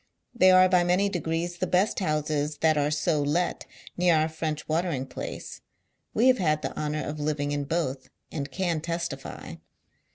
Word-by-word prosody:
They 185 -6 +5
are 185 0 +7
by 180 -1 +4
many 180 +3 +2
degrees 175 -1 -2
the 185 - 0
best 185 +5 +2
houses 150 -3 -1
that 160 -1 +4
are 145 0 +1
so 150 0 +1
let 150 +5 -1 0.3
near 175 -1 +3
our 155 +1 +2
French 160 -1 -4
watering 160 -4 -1
place; 130 - -7 0.5
we 230 - +3
have 255 -2 +5
had 155 -4 +1
the - - -4
honour 150 0 -2
of 150 0 -5
living 145 -1 -1
in 145 -1 -1
both, 140 -4 -2 0.2
;illli 145 -2 -4
Can 170 0 -1
testily. 170 +1 -5
160 Hz, 170 wpm, -27 LUFS, 150-180 Hz, 0.5 s, are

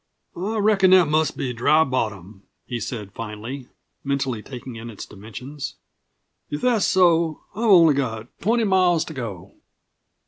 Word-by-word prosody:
"I 205 +5 -3
reckon 205 -3 +4
that 185 -4 +6
must 155 0 +1
be 125 -2 -2
Dry 150 +7 +4
Bottom," 110 - -3 0.2
he 120 -2 -4
said 110 -5 -6
finally, 115 +4 -7 0.4
mentally 135 -5 -1
taking 125 0 -9
in 115 +1 -8
its 105 - -8
dimensions. 125 +8 -8 0.7
"If 145 - -4
that's 240 -5 +2
so, 170 -4 +3
I've 220 +5 -3
only 170 -7 +7
got 115 -5 -2
twenty 230 +4 +1
miles 185 -5 +3
to 160 - -8
go." 115 - -7
140 Hz, 145 wpm, -23 LUFS, 115-180 Hz, 0.7 s, only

